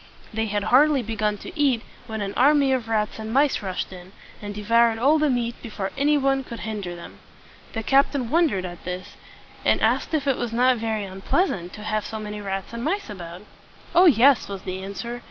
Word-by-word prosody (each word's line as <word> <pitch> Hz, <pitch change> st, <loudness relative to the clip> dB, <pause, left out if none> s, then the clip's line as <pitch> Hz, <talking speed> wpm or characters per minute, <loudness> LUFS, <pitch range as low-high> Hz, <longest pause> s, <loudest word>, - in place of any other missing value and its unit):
They 220 Hz, +1 st, -1 dB
had 205 Hz, -1 st, -1 dB
hardly 280 Hz, +2 st, +4 dB
begun 215 Hz, -1 st, -1 dB
to -, -, -10 dB
eat 270 Hz, -6 st, +2 dB, 0.2 s
when 220 Hz, -2 st, -4 dB
an 200 Hz, 0 st, -3 dB
army 280 Hz, +1 st, +4 dB
of 245 Hz, -3 st, -1 dB
rats 215 Hz, -1 st, -1 dB
and 220 Hz, 0 st, -5 dB
mice 280 Hz, +3 st, +2 dB
rushed 190 Hz, -1 st, -4 dB
in, 180 Hz, +1 st, -12 dB, 0.3 s
and 205 Hz, -1 st, -6 dB
de 210 Hz, -, -6 dB
voured 230 Hz, +1 st, +4 dB
all 290 Hz, +6 st, +4 dB
the 300 Hz, -1 st, +2 dB
meat 240 Hz, -2 st, 0 dB
before 205 Hz, -4 st, -5 dB
any 295 Hz, +2 st, +3 dB
one 270 Hz, -1 st, +1 dB
could 235 Hz, -3 st, -8 dB
hinder 205 Hz, -5 st, -4 dB
them. 170 Hz, -, -11 dB, 0.5 s
The 225 Hz, -, -3 dB
captain 270 Hz, -1 st, +2 dB
wondered 305 Hz, -, +2 dB
at 175 Hz, -1 st, -8 dB
this, 180 Hz, +1 st, -6 dB, 0.5 s
and -, -, +3 dB
asked -, -, +1 dB
if 295 Hz, -2 st, -1 dB
it 275 Hz, -3 st, +1 dB
was 240 Hz, -2 st, -3 dB
not 250 Hz, +1 st, +3 dB
very 220 Hz, -2 st, -2 dB
un 190 Hz, 0 st, -9 dB
pleas 365 Hz, -, +2 dB
ant 175 Hz, 0 st, -6 dB
to 210 Hz, -, -9 dB
have 215 Hz, 0 st, -1 dB
so 220 Hz, -, -6 dB
many 210 Hz, -1 st, -6 dB
rats 195 Hz, +1 st, -4 dB
and 235 Hz, 0 st, -5 dB
mice 375 Hz, -, -2 dB
about. 175 Hz, -1 st, -9 dB, 0.5 s
"Oh, 360 Hz, +2 st, +7 dB
yes!" 270 Hz, -2 st, +5 dB
was 195 Hz, -1 st, -6 dB
the 185 Hz, 0 st, -5 dB
answer. 235 Hz, +5 st, -5 dB
225 Hz, 215 wpm, -24 LUFS, 200-270 Hz, 0.5 s, Oh